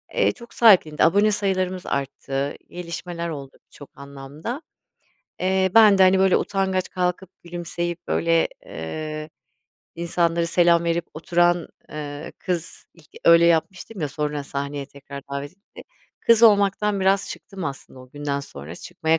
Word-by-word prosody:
eee, - - +3
çok 235 0 -14
sahiplendi. 185 -10 +5
Abone 205 +5 +4
sayılarımız 185 -3 -1
arttı, 140 0 -3
gelişmeler 170 0 -5
oldu 140 -4 -8
birçok 145 - -14
anlamda. 140 - -7 0.8
Eee, 190 0 +2
ben 215 -3 +7
de, - - +7
hani, 190 0 +5
böyle 190 0 +4
utangaç, 190 -2 -1
kalkıp 180 0 -2
gülümseyip 175 0 -5
böyle, 165 0 +2 0.2
ııı, 155 - -6 0.7
insanlara 170 0 0
selam 170 0 +3
verip 170 0 0
oturan, 175 +2 +1 0.2
ııı, 145 -1 -6
kız, 175 -2 -4
ilk 160 -3 -21 0.2
öyle 170 0 +7
yapmıştım 185 +5 0
ya, 150 - -1
sonra 150 0 -3
sahneye 140 0 -4
tekrar 140 0 -10
davet 140 +2 -4
edildiğim 200 +2 -16 0.4
kız 230 -1 +4
olmaktan 205 -1 +4
biraz 195 +1 +2
çıktım 195 -4 -8
aslında 135 -3 -7
o 130 0 -15
günden 145 0 -3
sonra. 80 - -9
Çıkmaya 160 - -1
170 Hz, 140 wpm, -23 LUFS, 145-190 Hz, 0.8 s, ben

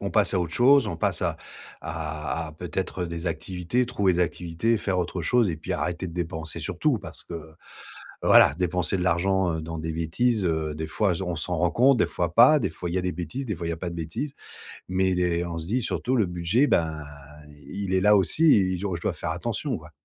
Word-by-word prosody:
on 100 - -3
passe 105 -2 +3
à 95 - +2
autre 85 -2 -3
chose. 130 -1 +5
On 85 - -4
passe - - 0
à - - 0 0.4
à 80 0 -4
à - - -10
peut-être, 90 +3 -4
heu, - - -4
des 85 +1 -3
activités, 90 +8 -2
trouver 100 -7 +1
des 90 - 0
activités, 90 +5 0
faire 95 -3 -1
autre 90 0 -2
chose 115 +4 +3
et 80 - -2
puis 80 - -5
arrêter 90 +1 -2
de 85 - -9
dépenser 80 -3 -4
sur - - -5
tout - - +2
parce - - -10
que 80 -2 -9 0.7
voilà - - +6
dépenser 90 +1 0
de - - -3
l'argent, 90 +1 +2
heu, 80 - -4
dans 80 0 -6
des 80 +1 -3
bêtises, 95 +7 0
heu, 80 -2 -1
des 80 +1 -3
fois 95 +2 +1
je 95 - -4
on 90 -2 -3
s'en 85 +3 -2
rend 90 +1 +2
compte, 130 +2 +4
des 100 - +3
fois 85 +1 -3
pas. 130 +6 +7
Des - - -1
fois 85 -1 -5
il - - -4
y 95 - +1
a - - -2
des 90 0 -1
bêtises, 90 - -5
des 105 - -2
fois 85 - -6
il 85 - -1
y - - -1
a - - -7
pas 90 +1 -4
de 85 - -7
bêtises, 85 - -4 0.6
mais 95 0 +1
des 90 -1 0
on 85 -1 -4
se 80 - -6
dit 125 +4 +1
surtout: 125 +3 -1
«Le 110 -5 +3
budget, 90 +10 +1
ben, 80 - 0 0.6
il 95 +2 -4
est 95 - +3
là 105 +2 +6
aussi 140 - +4
et 95 -2 +1
je 100 - -3
je - - -9
dois - - -1
faire - - -4
attention, - - -3
quoi». - - -14
90 Hz, 250 wpm, -25 LUFS, 80-100 Hz, 0.7 s, pas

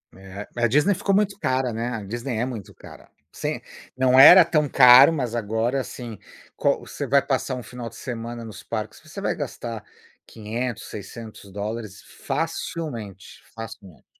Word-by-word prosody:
É, 95 +1 -9
a 120 0 +2
Disney 150 - +3
ficou 200 +1 0
muito 200 0 +1
cara, 130 -2 0
né, 115 +2 -3
a 115 -4 -4
Disney 120 +3 -4
é 120 - 0
muito 105 -6 -7
cara. - - -14 0.2
Sem - - -4 0.3
não 130 0 +3
era 175 +6 +11
tão 155 -3 +1
caro, 130 +3 +8
mas 125 -6 -2
agora, 115 +4 -1
assim, 120 -5 -8 0.4
qual - - +1
você - - -6
vai - - +4
passar 130 - -1
um 125 - -6
final 120 -2 -7
de - - -16
semana 120 -1 -6
nos 100 -2 -10
parques, 110 -1 -5
você 155 +5 -10
vai - - -1
gastar 120 -6 -6 0.4
$500,00 115 +2 -5
$600,00 105 0 -7 0.2
facilmente, 115 - -4
facilmente. 110 -6 -10
120 Hz, 155 wpm, -24 LUFS, 110-130 Hz, 0.4 s, era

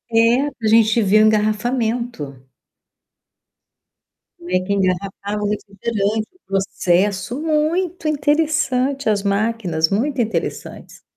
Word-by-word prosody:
,é, 235 +5 +4
a 240 -6 -7
gente 220 +1 +4
vê 205 0 +3
o 215 - +6
engarrafamento. 215 - -1 2.0
Como 175 - -10
é 185 0 +2
que 185 +2 -3
engarrafava 200 +2 -2
o 205 - 0
refrigerante, 210 +1 -2
o 365 - -27
processo 195 +4 0
muito 320 +3 0
interessante, 290 -3 +1
as 205 -2 0
máquinas 200 -6 0
muito 260 +7 0
interessantes. 225 0 -5
215 Hz, 110 wpm, -20 LUFS, 200-255 Hz, 2.0 s, o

